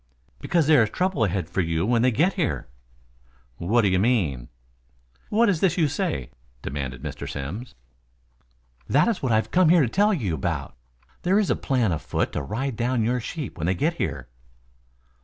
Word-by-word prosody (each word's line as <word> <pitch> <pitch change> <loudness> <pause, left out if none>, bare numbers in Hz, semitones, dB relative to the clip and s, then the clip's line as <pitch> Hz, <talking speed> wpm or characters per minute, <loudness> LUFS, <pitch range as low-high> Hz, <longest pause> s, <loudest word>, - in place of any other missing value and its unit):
"Because 170 - +1
there 150 -3 +6
is 110 - +2
trouble 180 - 0
ahead 95 -3 -2
for 95 - -1
you 80 0 0
when 115 +1 +2
they 125 - +4
get 165 - +2
here." 170 -7 -2 0.9
"What 110 - +2
do - - +4
you 95 -1 +2
mean?" 90 - 0 0.8
"What 230 +3 +3
is 190 -7 +2
this 180 -1 +2
you 160 -4 +3
say?" 145 - -3 0.3
demanded 65 -3 -5
Mr. - - -6
Simms. 80 - -6 1.1
"That 150 - +4
is 230 -4 0
what 130 - 0
I - - +4
have 110 - 0
come 180 -2 +4
here 170 -2 +6
to - - +1
tell 205 - +2
you 115 - -1
about. 70 - -3 0.5
There 185 +3 +2
is 210 -2 +2
a - - +2
plan 125 -8 0
on 80 - -1
foot - - -2
to - - -2
ride 120 - -3
down 120 0 0
your 125 +3 +1
sheep 140 - -6
when 80 - -1
they 95 - +1
get 165 - 0
here." 65 -2 -3
120 Hz, 195 wpm, -24 LUFS, -, 1.1 s, there